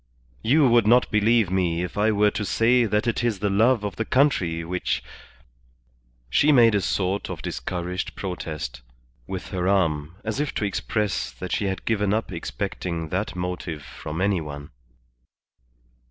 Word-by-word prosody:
"You 140 +4 +4
would 120 -3 +4
not 120 +2 +4
believe 110 -2 +3
me 90 -2 +1
if 90 - -6
I 105 +2 +3
were 105 0 +3
to 105 - -3
say 120 +4 +3
that 105 +1 0
it 120 0 0
is 115 -4 +1
the 100 +1 -1
love 110 +3 +3
of 100 -2 -4
the 110 - 0
country 95 - +2
which 90 +2 -2 0.6
" - - -36 0.5
She 150 - +4
made 120 -5 +6
a 100 - +2
sort 95 +1 -1
of - - -6
discouraged 90 +1 -4
protest 85 -8 -5 0.5
with 95 -1 -5
her 90 -1 -2
arm, 80 -5 +1
as 110 +3 -3
if 150 -1 -2
to 105 - 0
express 105 +1 -1
that 75 +9 -7
she 105 - 0
had 95 -1 -3
given 105 -2 +1
up 110 -2 -2
expecting 85 -2 -4
that 95 +4 -2
motive 90 -4 -4
from 75 +5 -6
any 100 -3 +2
one. 70 -1 -8
100 Hz, 170 wpm, -24 LUFS, 90-110 Hz, 0.6 s, made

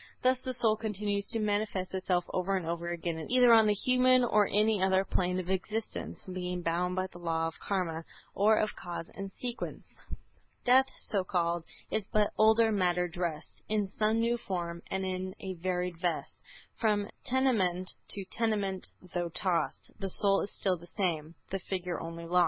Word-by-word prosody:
Thus 255 0 +4
the 255 0 -3
soul 225 -3 +3
continues 205 -2 -2
to - - -1
manifest 205 -3 -1
itself 185 -2 0
over 190 +1 0
and 180 - -4
over 170 +1 -2
again 170 -1 -3
either 245 -1 +6
on 220 -1 +7
the 210 - +3
human 255 +3 +4
or 210 -4 +4
any 210 0 +2
other 190 0 +3
plane 180 -1 0
of 185 0 -3
existence, 215 +4 -3
being 180 -1 -4
bound 175 +2 0
by 185 0 0
the 180 -2 -11
Law 165 -1 0
of 165 - -7
Karma 170 -5 -2 0.3
or 215 +2 +4
of 215 - 0
Cause 170 -1 -6
and 195 -1 -6
Sequence. 245 +4 -5 0.8
"Death, 260 +2 +6
so 200 -4 0
called, 170 -2 0 0.3
is 210 -2 -1
but 210 -1 +2
older 220 +1 +5
matter 180 -3 +2
dressed 170 -3 -4
In 210 -2 +1
some 215 +3 +1
new 235 +1 +2
form. 170 -6 -4
And 190 0 -1
in 185 0 -3
a 190 -1 -4
varied 180 0 -2
vest, 175 -1 -2 0.3
From 210 -3 +1 0.2
tenement 205 -9 +1 0.2
to 195 -2 -3
tenement 200 -3 -1 0.3
though 175 -1 -1
tossed, 175 +1 -1
The 195 - -2
soul 195 +1 +4
is 200 - -3
still 190 -2 0
the 170 +1 -14
same, 170 -5 -2 0.2
the 195 - -1
figure 180 -2 -3
only 165 0 -6
lost." 180 +2 +3
190 Hz, 175 wpm, -31 LUFS, 175-215 Hz, 0.8 s, on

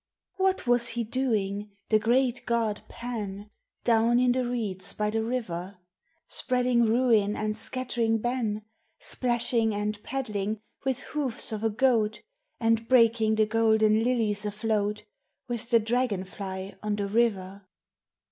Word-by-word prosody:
What 380 0 +1
was 240 -1 +3
he 235 0 0
doing, 210 -4 -1 0.2
the 215 - +4
great 245 +3 +1
god 230 -3 0
Pan, 210 -4 -6 0.3
Down 235 0 +3
in 250 0 +4
the 255 +1 +1
reeds 220 -7 -2
by 210 0 -1
the 225 0 0
river? 200 -6 -4 0.5
Spreading 250 -2 +1
ruin 225 -3 +3
and 215 0 -2
scattering 235 -1 0
ban, 225 -2 -2 0.3
Splashing 235 -3 +1
and 210 0 -2
paddling 215 -5 -3 0.2
with 265 -1 -1
hoofs 275 -8 -2
of 215 0 -4
a 225 - +3
goat, 220 -2 +1 0.4
And 225 0 +1
breaking 230 -3 +4
the 215 0 +3
golden 220 0 +3
lilies 225 -4 +1
afloat 210 0 -1 0.4
With 240 -1 -3
the 230 - +5
dragon 225 -3 0
fly 190 0 -6
on 210 -1 -1
the 205 -1 -2
river? 200 -3 0
225 Hz, 135 wpm, -27 LUFS, 210-240 Hz, 0.5 s, the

